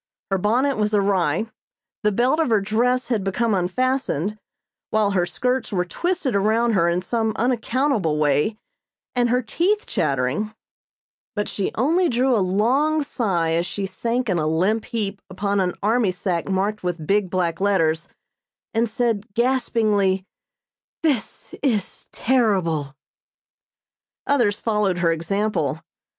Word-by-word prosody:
Her 195 - +2
bonnet 250 +8 +1
was 210 0 +1
awry, 195 -3 +1 0.6
the 210 -1 +2
belt 250 +9 +2
of 320 - +2
her 220 -2 +4
dress 245 +6 0
had 225 -5 0
become 215 +4 0
unfastened, 210 - 0 0.5
while 215 -2 +2
her 180 -3 +1
skirts 250 +5 -1
were 180 -3 0
twisted 315 - -1
around 220 +4 +2
her 170 -4 +3
in 175 +1 0
some 220 +1 0
unaccountable 240 - 0
way 150 +8 +1 0.6
and 245 -1 +2
her 250 +2 +2
teeth 380 - 0
chattering; 145 +10 -1 0.8
but 210 -1 -1
she 200 - -2
only 335 +9 +2
drew 250 +1 +2
a - - +2
long 260 +12 +2
sigh 185 -11 0
as 170 +2 0
she 200 - -3
sank 235 +5 -2
in 180 -4 +1
a 155 - 0
limp 190 +8 +1
heap 205 -3 -3
upon 200 +2 -1
an 180 -2 0
army 220 0 +2
sack 180 -1 -2
marked 200 +3 0
with 175 -3 -3
big 200 +1 +1
black 170 -1 -1
letters, 165 -5 +1 0.7
and 230 0 +1
said 225 -3 -1
gaspingly: 220 -6 +1 0.8
"This 275 -10 -1
is 225 -9 -1
terrible!" 185 - +1 1.3
Others 235 -8 +2
followed 210 -5 +1
her 170 -1 +2
example. 180 0 -1
210 Hz, 135 wpm, -22 LUFS, 185-240 Hz, 1.3 s, her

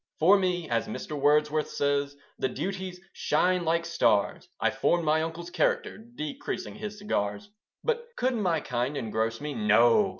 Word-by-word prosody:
For 180 +6 +6
me, 180 -3 0
as 115 -4 0
Mr. - - -6
Wordsworth 150 +1 +2
says, 140 0 0 0.2
The 130 - +1
duties 185 +6 -4
shine 180 -1 +1
like 170 +1 +1
stars; 170 -11 +1
I - - +2
formed 170 -1 +1
my 155 +1 +3
uncle's 165 +2 -5
character, 180 - 0
Decreasing 220 -10 -5
his 210 0 -6
cigars. 105 - -2 0.3
But 470 0 -1
could 255 +1 +1
my 180 -9 +1
kind 125 +3 -2
engross 115 -1 -1
me? 150 0 -4
No! 115 - +4
160 Hz, 155 wpm, -28 LUFS, 140-185 Hz, 0.3 s, For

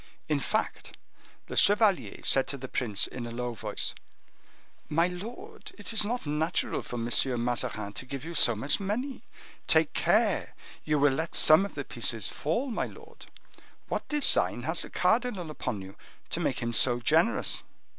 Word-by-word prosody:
In - - 0
fact - - -3 0.5
the - - -7
chevalier 200 - +3
said 135 -1 +4
to 140 - -4
the 130 0 -7
prince 110 -6 0
in 120 -2 -7
a - - -7
low 120 +1 -4
voice, 110 - -3 1.0
"My 165 +3 +2
lord, 185 +7 -9
it 205 +2 -6
is 220 - +2
not 240 +1 -3
natural 155 +3 -1
for - - -8
M. 115 -1 -3 0.4
Mazarin 105 -4 -2
to 130 - -6
give 135 +2 -6
you 170 - -6
so 120 -7 +4
much 135 - 0
money. 235 +8 -3 0.5
Take - - +3
care! - - +1 0.3
you 150 -1 0
will 145 -1 +3
let 160 +4 -3
some 160 +6 +6
of - - -18
the 140 -2 -5
pieces 115 -4 -1
fall, 240 - -2
my 220 - -2
lord. 450 +1 -14 0.6
What - - -3
design 290 - +4
has 160 +5 0
the - - -5
cardinal 210 -4 0
upon 105 -9 -4
you 95 +1 -11 0.4
to - - -1
make - - -1
him 120 0 -2
so 120 +1 +5
generous?" 165 - +1
155 Hz, 170 wpm, -28 LUFS, 120-205 Hz, 1.0 s, some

